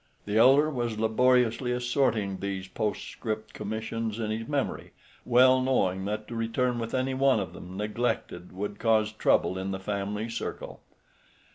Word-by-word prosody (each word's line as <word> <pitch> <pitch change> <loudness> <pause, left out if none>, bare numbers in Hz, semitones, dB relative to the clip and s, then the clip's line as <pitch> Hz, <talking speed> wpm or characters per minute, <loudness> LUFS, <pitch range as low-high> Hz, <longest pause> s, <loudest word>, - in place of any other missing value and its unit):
The 105 - -3
elder 135 +7 +6
was 120 -5 -2
laboriously 125 +2 +2
assorting 120 -6 0
these 95 -1 -4
postscript 110 +2 -4
commissions 110 0 -4
in 110 -2 -2
his 110 +1 -3
memory, 145 -2 -2 0.3
well 130 +1 +5
knowing 95 -8 +1
that 105 +1 -3
to 120 - -6
return 120 +2 0
with 115 +1 -3
any 130 +1 0
one 130 -3 +3
of 90 -4 -4
them 90 +1 -9
neglected 105 -4 -2
would 100 +2 -5
cause 110 -1 +2
trouble 95 -3 +2
in 95 +1 -3
the 95 -1 -3
family 100 +2 -3
circle. 115 - -6
110 Hz, 150 wpm, -28 LUFS, 105-125 Hz, 0.3 s, elder